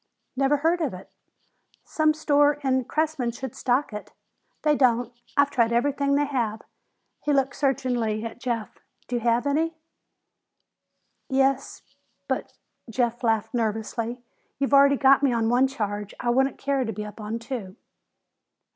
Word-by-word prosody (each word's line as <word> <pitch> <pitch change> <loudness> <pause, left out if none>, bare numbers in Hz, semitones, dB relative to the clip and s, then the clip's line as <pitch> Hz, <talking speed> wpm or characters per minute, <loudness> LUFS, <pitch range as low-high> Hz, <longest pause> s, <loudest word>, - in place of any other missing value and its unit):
"Never 275 +2 +2
heard 330 +4 +1
of 275 - -1
it." 185 - -12 0.7
"Some 310 -1 +1
store 290 -1 +3
in 260 -2 +1
Cressman 310 -5 -1
should 240 +1 -6
stock 255 0 0
it." 210 - -8 0.5
"They 300 -1 +4
don't. 245 -3 +2 0.2
I've 285 0 +4
tried 235 -3 +2
everything 280 +3 +1
they 290 +1 +2
have." 235 -6 -2 0.6
He 295 - 0
looked 275 -1 +1
searchingly 245 -5 0
at 230 - -7
Jeff. 235 -4 -4 0.3
"Do 245 - -1
you - - -1
have 235 +2 +1
any?" 320 +3 0 1.5
"Yes 270 0 +1 0.4
but," - - -3 0.3
Jeff 240 +1 -1
laughed 225 -1 +1
nervously, 230 +1 -2 0.3
"you've 275 0 -1
already 280 0 +6
got 275 0 +5
me 275 -2 +3
on 230 -1 +1
one 250 +3 +4
charge. 210 -6 -4
I 240 - 0
wouldn't 265 +2 +2
care 275 -1 0
to 225 - -3
be 210 0 -5
up 210 +1 -9
on 215 +2 -3
two." 230 -5 -6
255 Hz, 150 wpm, -25 LUFS, 230-280 Hz, 1.5 s, already